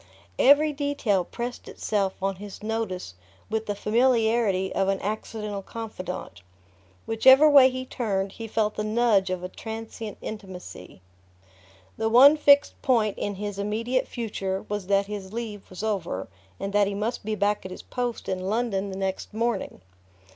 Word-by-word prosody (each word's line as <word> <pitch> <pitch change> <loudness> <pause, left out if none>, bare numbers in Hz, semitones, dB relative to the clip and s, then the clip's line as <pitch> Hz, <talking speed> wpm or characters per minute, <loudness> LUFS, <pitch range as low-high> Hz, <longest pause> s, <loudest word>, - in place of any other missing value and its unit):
Every 295 +3 +6
detail 280 -10 0
pressed 240 +6 -6
itself 200 -3 -1
on 195 -1 0
his 205 +1 -10
notice 215 - -3 0.4
with 220 0 -1
the 205 - -1
familiarity 220 -3 +2
of 195 - +1
an 195 0 +1
accidental 210 0 -4
confidant: 185 - -7 0.6
whichever 265 +6 +6
way 280 -3 +8
he 255 0 -5
turned, 200 -6 -2
he 225 +2 -7
felt 215 -1 0
the 210 - -1
nudge 215 -3 +2
of 185 -1 -3
a - - -2
transient 220 +1 -7
intimacy... 185 - -9 1.0
The 225 - 0
one 265 +6 +8
fixed 285 -1 +4
point 225 -6 +2
in 205 - -2
his 205 0 -5
immediate 225 +5 -1
future 195 -5 -3
was 205 -2 -4
that 200 0 +3
his 200 -1 -7
leave 220 -3 -6
was 185 +2 -8
over 190 - -2 0.3
and 195 0 -4
that 205 -1 +4
he 200 - -3
must 220 +4 -2
be 215 +1 -2
back 205 0 0
at 185 - -7
his 185 - -9
post 245 -2 -4
in 185 0 -2
London 210 -3 -1
the 190 - -6
next 195 +2 -3
morning. 235 - -2
210 Hz, 160 wpm, -26 LUFS, 195-235 Hz, 1.0 s, way